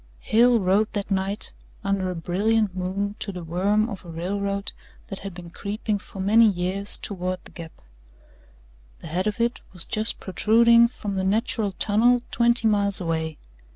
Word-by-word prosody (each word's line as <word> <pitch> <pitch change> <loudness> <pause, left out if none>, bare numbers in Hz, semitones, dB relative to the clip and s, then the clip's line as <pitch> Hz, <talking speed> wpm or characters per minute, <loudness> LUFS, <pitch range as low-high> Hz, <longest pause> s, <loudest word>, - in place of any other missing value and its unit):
XIII - - -16
Hale 235 +1 +5
rode 200 +3 +1
that 205 -1 -4
night 195 +1 -1 0.3
under 195 -1 -1
a 180 - -4
brilliant 200 +4 0
moon 190 +2 -2
to 200 - -3
the 180 -2 -7
worm 200 +6 +1
of 205 -5 -7
a 175 - -12
railroad 200 +4 -3 0.4
that 195 - -6
had 195 -2 -8
been 175 -1 -10
creeping 205 +2 -3
for 195 - -12
many 220 +4 +5
years 190 +2 -1
toward 185 -2 -4
the - - -15
Gap. 165 -2 -9 1.3
The - - -11
head 185 +5 -1
of 210 +2 -2
it 235 +1 0
was 180 -3 -4
just 215 +1 -1
protruding 235 +4 +4
from 205 -4 -6
the 190 - 0
Natural 210 0 0
Tunnel 230 +6 +3
twenty 235 -1 +5
miles 200 -2 +3
away. 160 -3 -3
200 Hz, 170 wpm, -24 LUFS, 185-215 Hz, 1.3 s, Hale